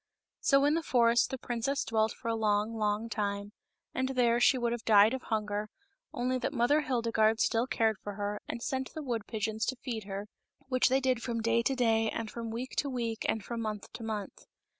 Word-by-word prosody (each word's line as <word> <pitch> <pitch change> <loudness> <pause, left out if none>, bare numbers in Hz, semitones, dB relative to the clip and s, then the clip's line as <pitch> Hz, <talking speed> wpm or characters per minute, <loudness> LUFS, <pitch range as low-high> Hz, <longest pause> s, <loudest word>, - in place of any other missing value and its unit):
So 275 0 +4
in 295 - +4
the 330 - +1
forest 235 -5 +3
the 265 - -3
princess 250 +3 -2
dwelt 220 -1 +1
for - - -9
a 230 - +1
long, 215 0 +1
long 215 0 0
time, 205 -2 -3 0.4
and 260 0 -1
there 240 -2 +3
she 260 +2 +5
would 240 -1 0
have 235 -2 -3
died 215 +1 +6
of 260 - -3
hunger, 210 -2 -2 0.4
only 255 +1 -1
that - - -2
Mother^ 285 +5 +3
Hildegarde 230 -4 +2
still 230 +3 +2
cared 225 -4 +1
for 205 - -6
her 205 +1 -3
and 235 - -5
sent 265 -2 -2
the 310 - -4
wood 235 -5 -3
pigeons 220 0 -2
to 260 - 0
feed 235 -4 -5
her, 200 +1 -5 0.4
which 255 0 +3
they 265 +1 +3
did 255 -2 +1
from 235 -2 -2
day 230 +1 +3
to 270 +3 0
day 225 -3 +2
and 225 -1 -4
from 230 -1 -5
week 240 +3 -5
to 285 - +1
week 230 -3 -2
and 220 -2 -1
from 235 -1 -4
month 215 -2 -5
to - - -8
month. 215 -3 -5
230 Hz, 215 wpm, -31 LUFS, 215-255 Hz, 0.4 s, died